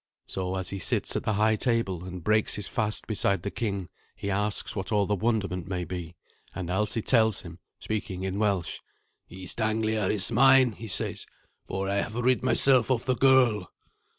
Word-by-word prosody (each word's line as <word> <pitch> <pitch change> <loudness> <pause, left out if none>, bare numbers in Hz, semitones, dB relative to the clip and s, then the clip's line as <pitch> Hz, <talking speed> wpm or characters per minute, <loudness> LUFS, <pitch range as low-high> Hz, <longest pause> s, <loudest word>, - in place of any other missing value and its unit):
So, 95 0 -3
as 95 0 -3
he 100 - -4
sits - - +1
at - - -2
the 110 - +1
high 110 +2 +3
table 110 -7 -1
and 90 -2 -7
breaks 110 +2 +2
his 105 - -5
fast 110 -2 -1
beside 100 -4 0
the 100 - -3
king, 100 -5 -3 0.3
he 100 - -4
asks 105 +2 0
what 95 0 -4
all 105 -2 +2
the 105 - -1
wonderment 100 -4 -1
may 90 -2 -3
be. 85 -1 -6 0.4
And 90 -2 -5
Alsi 105 +3 +1
tells 110 -5 +3
him, 85 0 -11 0.2
speaking 100 -4 -4
in 95 +1 -3
Welsh. 100 -6 0 0.5
"East 95 +5 -6
Anglia 110 -1 0
is 105 +1 0
mine," 130 +1 +6
he 110 +2 -9
says, 95 - -1 0.4
"for 95 +1 -3
I 100 +1 0
have 100 +2 -2
rid 125 +1 +2
myself 130 -1 +3
of 125 -3 0
the 130 -1 +1
girl." 125 -8 +3
105 Hz, 185 wpm, -27 LUFS, 95-110 Hz, 0.5 s, mine